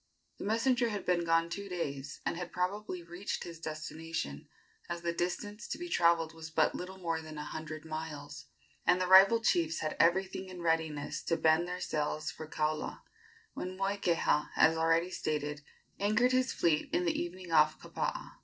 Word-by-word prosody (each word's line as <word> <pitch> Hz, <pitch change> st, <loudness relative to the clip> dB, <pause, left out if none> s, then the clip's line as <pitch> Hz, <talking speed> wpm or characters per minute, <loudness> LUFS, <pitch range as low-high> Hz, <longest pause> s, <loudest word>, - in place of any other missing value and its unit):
The -, -, -5 dB
messenger 235 Hz, +3 st, +2 dB
had 205 Hz, -2 st, -4 dB
been 175 Hz, -1 st, +2 dB
gone 165 Hz, 0 st, +3 dB
two 200 Hz, +4 st, -5 dB
days, 140 Hz, -6 st, -4 dB
and -, -, 0 dB
had 175 Hz, 0 st, -5 dB
probably 185 Hz, 0 st, -2 dB
reached 175 Hz, +4 st, -4 dB
his 170 Hz, -1 st, -8 dB
destination, 155 Hz, -, -5 dB, 0.4 s
as 170 Hz, 0 st, -4 dB
the 170 Hz, 0 st, 0 dB
distance 205 Hz, +6 st, -3 dB
to -, -, -3 dB
be 350 Hz, +1 st, -6 dB
travelled 170 Hz, -, +3 dB
was 160 Hz, 0 st, -8 dB
but 160 Hz, -1 st, +2 dB
little 185 Hz, +1 st, -6 dB
more 165 Hz, -3 st, -2 dB
than 155 Hz, -1 st, -9 dB
a 150 Hz, -, -4 dB
hundred 155 Hz, +1 st, -6 dB
miles, 150 Hz, -2 st, -6 dB, 0.4 s
and 180 Hz, -, +4 dB
the 185 Hz, -, +1 dB
rival 195 Hz, +5 st, +8 dB
chiefs 165 Hz, -5 st, +2 dB
had 155 Hz, -, -2 dB
everything 190 Hz, +2 st, +2 dB
in 180 Hz, -2 st, -8 dB
readiness 160 Hz, -3 st, 0 dB
to 165 Hz, -, +1 dB
bend 160 Hz, +2 st, +3 dB
their 180 Hz, 0 st, -4 dB
sails 155 Hz, +1 st, -2 dB
for 155 Hz, -1 st, -8 dB
Kaula, 155 Hz, 0 st, -2 dB, 0.5 s
when 185 Hz, +1 st, -5 dB
Moikeha, 195 Hz, -6 st, +1 dB
as 160 Hz, -, +5 dB
already 165 Hz, +2 st, +2 dB
stated, 150 Hz, -3 st, -2 dB, 0.4 s
anchored 215 Hz, +5 st, +3 dB
his 255 Hz, 0 st, +2 dB
fleet 155 Hz, -3 st, +1 dB
in 180 Hz, -, +1 dB
the 170 Hz, -, +2 dB
evening 175 Hz, 0 st, -6 dB
off 155 Hz, -1 st, +5 dB
Kapaa. -, -, -4 dB
170 Hz, 175 wpm, -32 LUFS, 155-185 Hz, 0.5 s, rival